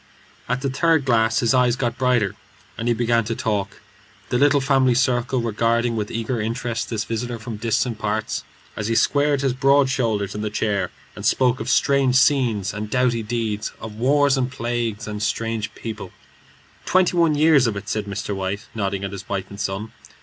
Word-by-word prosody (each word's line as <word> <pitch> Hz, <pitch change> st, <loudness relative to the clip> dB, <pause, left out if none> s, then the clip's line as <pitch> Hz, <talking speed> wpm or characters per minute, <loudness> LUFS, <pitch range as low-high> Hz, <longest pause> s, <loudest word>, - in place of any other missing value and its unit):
At 125 Hz, +1 st, 0 dB
the 140 Hz, -, -1 dB
third 160 Hz, +1 st, +2 dB
glass 115 Hz, -3 st, +2 dB
his 115 Hz, +1 st, +2 dB
eyes 125 Hz, -2 st, +3 dB
got 120 Hz, -2 st, -1 dB
brighter, 125 Hz, -6 st, +1 dB, 0.4 s
and 115 Hz, -, -4 dB
he 120 Hz, -, +3 dB
began 115 Hz, 0 st, +2 dB
to 115 Hz, +1 st, -2 dB
talk, 105 Hz, -5 st, -2 dB, 0.5 s
the 125 Hz, -, +1 dB
little 145 Hz, 0 st, +4 dB
family 135 Hz, -2 st, +3 dB
circle 125 Hz, 0 st, +1 dB
regarding 115 Hz, +1 st, +1 dB
with 105 Hz, -2 st, -2 dB
eager 115 Hz, +1 st, -2 dB
interest 115 Hz, +1 st, -3 dB
this 110 Hz, -2 st, -2 dB
visitor 120 Hz, +1 st, -3 dB
from 110 Hz, 0 st, -7 dB
distant 115 Hz, +1 st, -1 dB
parts, 110 Hz, 0 st, -2 dB, 0.3 s
as 110 Hz, -, -3 dB
he 115 Hz, -, 0 dB
squared 145 Hz, +2 st, +2 dB
his 135 Hz, -2 st, +1 dB
broad 135 Hz, +1 st, +3 dB
shoulders 110 Hz, -6 st, -1 dB
in 105 Hz, -, -4 dB
the 105 Hz, -, -2 dB
chair 105 Hz, -1 st, -1 dB, 0.3 s
and -, -, -8 dB
spoke 130 Hz, 0 st, +2 dB
of -, -, -4 dB, 0.2 s
wild 135 Hz, -2 st, +3 dB
scenes 125 Hz, -8 st, +3 dB
and 105 Hz, 0 st, -5 dB
doughty 125 Hz, -1 st, +1 dB
deeds; 110 Hz, -2 st, -3 dB
of 110 Hz, -, -7 dB
wars 140 Hz, +5 st, +3 dB
and 130 Hz, -1 st, -1 dB
plagues 115 Hz, -3 st, -3 dB
and 105 Hz, -1 st, -5 dB
strange 115 Hz, 0 st, -2 dB
peoples. 110 Hz, -4 st, -6 dB, 0.7 s
"Twenty 185 Hz, -1 st, +2 dB
one 165 Hz, -3 st, +3 dB
years 150 Hz, -4 st, +5 dB
of 110 Hz, -, -1 dB
it," 100 Hz, 0 st, -7 dB
said 105 Hz, -1 st, -2 dB
Mr. 100 Hz, 0 st, -4 dB
White, 95 Hz, +2 st, -3 dB
nodding 100 Hz, -2 st, -2 dB
at 100 Hz, -, -3 dB
his 100 Hz, -1 st, -8 dB
wife 100 Hz, 0 st, -3 dB
and 100 Hz, -, -9 dB
son. 105 Hz, +2 st, -3 dB
115 Hz, 190 wpm, -22 LUFS, 105-130 Hz, 0.7 s, years